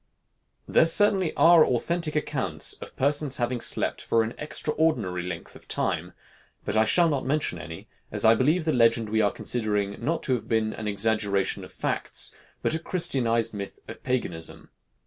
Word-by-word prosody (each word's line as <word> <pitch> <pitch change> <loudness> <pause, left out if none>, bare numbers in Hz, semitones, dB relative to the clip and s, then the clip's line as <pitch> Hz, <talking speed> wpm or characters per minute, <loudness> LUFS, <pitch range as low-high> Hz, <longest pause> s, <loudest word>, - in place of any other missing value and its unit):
There - - +4
certainly 190 -1 +3
are 170 -1 +7
authentic 155 +6 -1
accounts 150 - -1
of - - -10
persons 145 0 +1
having 120 0 -1
slept - - +2
for 115 -1 +2
an 110 +2 -4
extraordinary 150 - -1
length 90 -1 -7
of - - -15
time, - - -2 0.5
but 105 - -2
I 110 0 +4
shall 170 +9 +4
not 145 -4 -1
mention 140 - -1
any, 80 -1 -9 0.2
as - - -1
I 110 - +8
believe 155 +8 +2
the 155 - +1
legend 115 -2 +3
we 110 +1 +2
are 105 - +3
considering, 105 -4 -2
not 165 +3 -1
to 130 - +1
have 125 - -3
been 110 -1 0
an 110 - -6
exaggeration 100 -1 0
of - - -11
facts, - - -3 0.3
but - - +1
a 160 - 0
Christianized 120 -10 0
myth 100 -1 -6
of - - -9
paganism. 90 -11 -4
120 Hz, 170 wpm, -26 LUFS, 105-155 Hz, 0.5 s, I